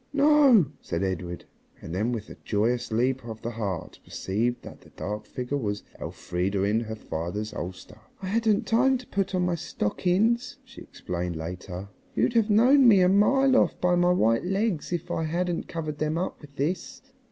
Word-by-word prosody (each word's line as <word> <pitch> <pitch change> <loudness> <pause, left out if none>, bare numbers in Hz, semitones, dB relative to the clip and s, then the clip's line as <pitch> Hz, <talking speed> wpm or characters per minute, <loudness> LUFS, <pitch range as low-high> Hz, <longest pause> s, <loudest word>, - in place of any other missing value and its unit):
"No," 285 - +6 0.2
said 85 +2 -3
Edred, 90 -2 -3 0.3
and 85 - -8
then 105 +6 0
with 115 -4 -4
a - - -10
joyous 120 +3 0
leap 125 +3 +1
of 110 -1 -8
the 120 - -3
heart 100 -7 -4
perceived 115 +6 -2
that - - -11
the - - -18
dark 105 +1 -5
figure 125 +5 -3
was 105 -4 -3 0.2
Elfrida 95 +2 -2
in 105 +3 +2
her 110 -1 -5
father's 105 +2 -4
ulster. 90 +4 -7 0.2
("I 195 - -7
hadn't 220 +2 +1
time 260 +4 +3
to 250 - -12
put 195 -3 -2
on 180 -1 +1
my 180 - +1
stockings," 185 - 0
she - - -13
explained 90 -1 -5
later. 90 +4 -6 0.3
"You'd - - +2
have 225 -2 +3
known 250 +6 +6
me 200 -5 +7
a 180 - +5
mile 260 +7 +4
off - - +3
by 180 0 +2
my 175 0 +4
white 115 -10 +2
legs 195 -3 -1
if 175 0 -3
I 165 - -1
hadn't 175 +2 -1
covered 155 -3 -5
them 155 +1 0
up 180 - -3
with 145 -2 -14
this.") 155 - -3
145 Hz, 185 wpm, -26 LUFS, -, 0.3 s, me